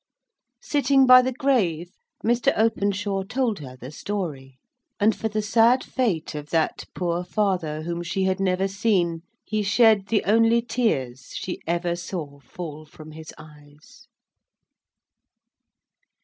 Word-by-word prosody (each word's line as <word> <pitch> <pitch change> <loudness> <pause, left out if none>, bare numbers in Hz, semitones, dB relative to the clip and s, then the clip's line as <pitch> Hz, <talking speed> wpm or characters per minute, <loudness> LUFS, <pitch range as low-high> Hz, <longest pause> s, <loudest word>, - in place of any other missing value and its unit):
Sitting 280 -2 +3
by 255 0 +9
the 255 +1 -1
grave, 215 - 0 0.3
Mr. 235 +1 +3
Openshaw 205 -2 0
told 225 +1 -1
her 130 -3 -9
the 130 +2 -9
story; 150 -8 -5 0.4
and 215 +1 +3
for 220 - -3
the 215 0 -2
sad 230 +4 +4
fate 205 -14 -2
of 150 0 -7
that 165 -1 0
poor 175 -1 -1
father 180 -6 -1
whom 170 +1 -4
she 175 +3 -2
had 190 0 0
never 190 0 +1
seen, 190 -5 0 0.2
he 215 -1 -1
shed 210 -1 +4
the 215 +1 +1
only 225 +3 +4
tears 135 - -2
she 185 - -5
ever 175 +1 0
saw 160 -5 -6
fall 155 0 -8
from 155 0 -13
his 160 0 -10
eyes. 150 -1 -17
190 Hz, 135 wpm, -24 LUFS, 160-220 Hz, 0.4 s, by